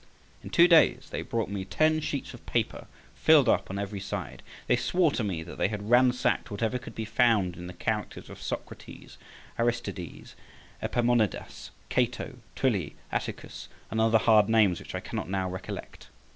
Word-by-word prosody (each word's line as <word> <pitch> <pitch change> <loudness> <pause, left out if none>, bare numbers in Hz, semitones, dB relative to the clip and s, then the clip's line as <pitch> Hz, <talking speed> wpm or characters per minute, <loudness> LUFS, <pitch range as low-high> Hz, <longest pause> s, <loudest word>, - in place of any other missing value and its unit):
In - - -7
two 170 +1 +6
days 155 -7 +4
they - - -3
brought 115 -2 -2
me 100 -2 -3
ten 155 +10 +2
sheets 140 -2 -4
of 120 - -12
paper 115 -2 -1 0.3
filled 155 -5 +5
up - - +2
on 95 - -4
every 100 0 -4
side. 95 - -5 0.2
They 125 - +3
swore 170 +6 +2
to 125 - -2
me 90 -6 -2
that 85 - -10
they - - +3
had 105 +1 -5
ransacked 125 0 +3
whatever 110 +4 -1
could 120 -2 -11
be 110 - -3
found 110 -5 +2
in 90 +1 -8
the 90 - -8
characters 85 - -3
of - - -11
Socrates, - - -7 0.4
Aristides, 115 -7 -3 0.5
Epaminondas, 120 -5 0 0.2
Cato, 125 0 -1 0.2
Tully, 100 - 0 0.2
Atticus, - - -5 0.2
and 110 - 0
other 115 0 +5
hard 110 -1 +4
names 105 -6 +4
which - - -8
I - - -3
cannot 80 - -5
now 95 -1 -1
recollect. 90 0 -7
115 Hz, 170 wpm, -28 LUFS, 100-125 Hz, 0.5 s, two